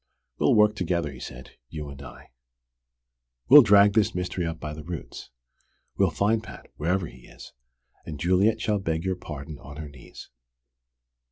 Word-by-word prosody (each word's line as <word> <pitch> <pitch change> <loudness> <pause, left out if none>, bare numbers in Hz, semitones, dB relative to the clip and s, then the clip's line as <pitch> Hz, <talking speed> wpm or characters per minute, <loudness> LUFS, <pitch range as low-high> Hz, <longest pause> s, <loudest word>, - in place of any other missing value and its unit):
"We'll - - +3
work 105 0 +4
together," 85 -6 -1
he 65 - -11
said, 60 +1 -9 0.2
"you 75 -2 -6
and 70 0 -10
I. 70 -2 -13 1.2
We'll 145 +2 +11
drag 100 -3 +5
this 110 -4 +2
mystery 90 -1 -2
up 80 -1 -5
by 75 0 -6
the 75 - -8
roots. 85 -1 -8 0.7
We'll - - +3
find 110 +2 +1
Pat, - - -12
wherever 90 +4 -1
he - - -13
is, - - -14 0.5
and 75 -2 -8
Juliet 95 +7 +2
shall 105 -2 0
beg 80 -2 -2
your 95 0 0
pardon 75 -3 -8
on 70 +1 -11
her 80 -2 -7
knees." 65 -4 -13
85 Hz, 165 wpm, -26 LUFS, 75-100 Hz, 1.2 s, We'll